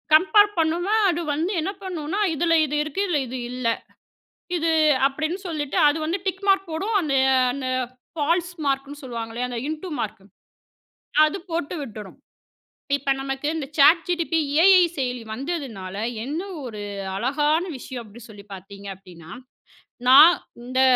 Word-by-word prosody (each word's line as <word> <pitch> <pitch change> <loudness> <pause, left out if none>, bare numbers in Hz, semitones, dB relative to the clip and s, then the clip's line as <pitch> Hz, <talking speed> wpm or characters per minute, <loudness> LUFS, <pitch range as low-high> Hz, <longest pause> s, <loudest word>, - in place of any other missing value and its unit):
Compare 410 +6 +6
பண்ணோன்னா 340 +5 +1
அது 345 -1 -1
வந்து 325 +6 -1
என்ன 325 +5 -2
பண்ணுனா 360 0 -3 0.2
"இதுல 330 +2 +1
இது 295 0 -3
இருக்கு, 305 +5 -3
இதுல 330 -5 +1
இது 255 +2 -5
இல்ல 250 -1 -3 0.9
இது" 330 -1 +1 0.4
அப்டின்னு 310 +6 -3
சொல்லிட்டு 300 -2 -3
அது 290 +2 +2
வந்து 335 +4 -1
டிக் 380 +1 -3
மார்க் 390 -2 +3
போடும். 390 +8 -2
அந்த 300 -5 -2 0.4
அந்த 265 0 -4 0.5
ஃபால்ஸ் 335 +3 0
மார்க்ன்னு 280 +1 -2
சொல்லுவாங்களே, 230 -1 -5
அந்த 240 -1 -4
இன்டு 315 +4 -5
மார்க் 210 -3 -4 1.0
அது 310 +5 -2
போட்டு 335 0 -3
விட்டுடும். 215 -6 -9 0.8
இப்ப 280 -1 -3
நமக்கு 270 +1 -4
இந்த 300 -4 -3
சேட் 320 +4 +6
ஜிடிபி 335 -2 0 0.2
ஏஐ 375 0 +7 0.2
செயலி 250 -2 -2
வந்ததுனால 240 - -5 0.3
என்ன 295 +6 -3 0.2
ஒரு 220 -4 -7 0.4
அழகான 295 - +1
விஷயம் 255 -1 -7
அப்டி 220 +2 -14
சொல்லிப் 205 -1 -14
பாத்தீங்க 195 +1 -10
அப்டின்னா, 175 -4 -15 0.8
"நான் 305 +7 +9 0.3
இந்த 255 +2 0
295 Hz, 140 wpm, -23 LUFS, 250-340 Hz, 1.0 s, நான்